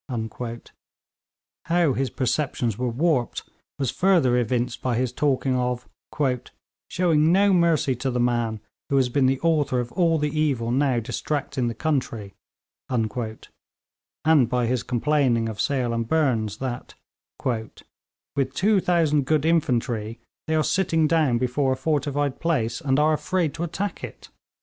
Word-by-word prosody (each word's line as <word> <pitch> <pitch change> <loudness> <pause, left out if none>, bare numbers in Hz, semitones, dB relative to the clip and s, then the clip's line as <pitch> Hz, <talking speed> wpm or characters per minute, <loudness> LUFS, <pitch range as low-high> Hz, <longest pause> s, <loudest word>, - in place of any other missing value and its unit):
How 170 -4 +3
his 135 +1 -1
perceptions 125 -4 -1
were 125 +3 -2
warped 130 -1 0 0.3
was 135 -3 -1
further 175 -10 +3
evinced 125 0 -1
by 125 -2 0
his 125 +1 0
talking 135 -2 +1
of 125 0 -2 1.0
'showing 165 -3 +2
no 195 +2 +4
mercy 165 -6 +2
to 130 +2 -2
the 125 -1 -1
man 120 -3 0 0.3
who 140 - +1
has 130 -2 +3
been 130 +1 +2
the 135 0 +1
author 150 -6 +1
of 120 -1 -4
all 165 -3 +2
the 150 -1 -1
evil 130 -7 0
now 130 -1 +2
distracting 135 +2 -2
the 115 - -3
country,' 115 - -2 0.6
and 115 -4 0 1.4
by 125 -1 +1
his 125 +1 0
complaining 125 -2 +1
of 110 -2 -4
Sale 130 -4 0
and 115 -1 -2
Burnes 115 -9 +1
that, 125 -1 -5 0.5
'with 130 +3 -5
2000 175 -7 +2
good 155 0 +2
infantry, 120 -8 0 0.3
they 160 - +1
are 155 - +2
sitting 175 -4 +1
down 150 -7 +2
before 130 +2 +1
a - - -5
fortified 145 -1 -1
place, 125 -7 -1
and 135 -3 +1
are 155 +1 +3
afraid 170 -1 -1
to 165 - -7
attack 195 +4 -4
it.' - - -9
135 Hz, 140 wpm, -24 LUFS, 120-155 Hz, 1.4 s, no